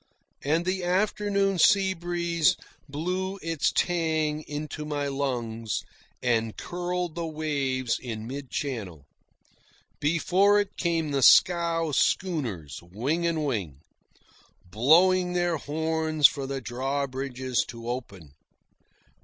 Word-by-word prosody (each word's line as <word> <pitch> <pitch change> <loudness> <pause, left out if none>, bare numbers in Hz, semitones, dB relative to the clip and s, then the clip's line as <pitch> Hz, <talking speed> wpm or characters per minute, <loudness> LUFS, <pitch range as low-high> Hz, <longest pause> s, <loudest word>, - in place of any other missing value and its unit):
And 160 +4 +1
the 185 0 -1
afternoon 200 +1 +1
seabreeze 175 -4 +3 0.3
blew 185 +6 -3
its 165 -2 0
tang 160 -3 0
into 150 +1 -5
my 145 -1 -2
lungs, 120 -5 -2 0.4
and 115 -3 0
curled 180 -1 -3
the 170 0 -3
waves 140 -6 -1
in 110 -3 -6
mid 135 +2 -6
channel. 100 - -4 0.9
Before 185 +6 +3
it 205 - -2
came 165 -3 -1
the 140 -1 0
scow 170 +1 +5
schooners, 125 - -1
wing 125 - -2
and 160 -2 -1
wing, 95 - -3 0.8
blowing 175 - +4
their 175 -2 +1
horns 160 0 +2
for 135 -2 -5
the 135 0 -4
drawbridges 130 0 -2
to 115 -1 -9
open. 100 - -6
150 Hz, 105 wpm, -27 LUFS, 130-175 Hz, 0.9 s, scow